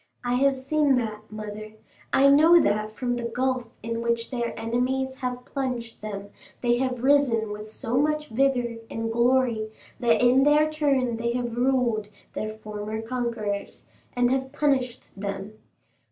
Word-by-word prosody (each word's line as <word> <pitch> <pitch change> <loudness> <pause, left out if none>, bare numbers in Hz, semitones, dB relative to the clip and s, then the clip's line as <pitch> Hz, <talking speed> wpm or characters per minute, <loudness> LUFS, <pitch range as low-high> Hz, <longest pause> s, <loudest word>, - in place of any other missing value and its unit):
I 245 0 0
have 270 +2 +3
seen 280 +1 +2
that, 215 -3 -3
mother; 215 0 -7 0.4
I 275 - +5
know 315 +5 +7
that 215 -5 +1
from 245 +2 -2
the 240 -1 -3
gulf 255 +1 -1 0.2
in 230 0 -3
which 235 +1 -1
their 240 -2 -3
enemies 255 +3 -1
have 250 -1 -4
plunged 250 -4 -4
them 200 -1 -6 0.3
they 240 -1 +2
have 255 -2 -1
risen 260 -6 +3
with 210 +1 -7
so 225 +3 -3
much 300 +1 0
vigor 245 -1 +1
and 225 0 -3
glory 235 -2 +2 0.3
that 230 -2 +3
in 250 +2 +5
their 300 +2 +4
turn 275 -6 +1
they 235 +1 -1
have 240 -1 -2
ruled 240 -4 +1 0.3
their 215 - -3
former 215 0 -6
conquerors, 225 -4 -3 0.3
and 245 0 +3
have 265 0 -1
punished 270 -4 0
them. 200 +1 -6
245 Hz, 155 wpm, -26 LUFS, 220-265 Hz, 0.4 s, know